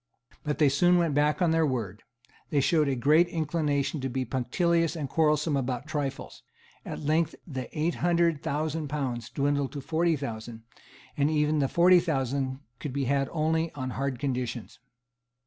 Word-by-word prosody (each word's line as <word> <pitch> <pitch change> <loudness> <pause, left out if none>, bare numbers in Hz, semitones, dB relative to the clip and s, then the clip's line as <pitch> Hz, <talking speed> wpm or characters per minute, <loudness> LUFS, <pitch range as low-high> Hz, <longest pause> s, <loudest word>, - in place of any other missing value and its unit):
But 150 -1 -2
they 150 - +4
soon 175 +6 +4
went 170 -4 +1
back 150 +1 +2
from 175 -3 +2
their 165 0 +3
word; 115 -8 -2 0.5
they 145 - +2
showed 155 +1 +3
a 135 - +1
great 150 +7 +4
inclination 150 -3 -1
to 135 - -2
be 130 +1 -2
punctilious 165 +8 0
and 150 -4 -3
quarrelsome 150 0 +2
about 130 -1 -2
trifles; 145 -3 -4 0.4
at - - -6
length 155 +2 +1
the 130 -7 -6
eight 165 +3 +1
hundred 170 -3 +2
thousand 155 +1 -2
pounds 130 -6 -3
dwindled 140 -1 0
to 145 - -4
forty 165 +3 +1
thousand; 115 -4 -6 0.5
and 145 +1 +2
even 150 0 +1
the 140 - +2
forty 180 +4 +5
thousand 135 -4 -2 0.2
could 145 - -5
be 140 -1 -1
had 135 +1 +1
only 160 +1 0
on 130 -2 -4
hard 135 -1 -2
conditions. 125 -3 -4
145 Hz, 165 wpm, -28 LUFS, 135-160 Hz, 0.5 s, forty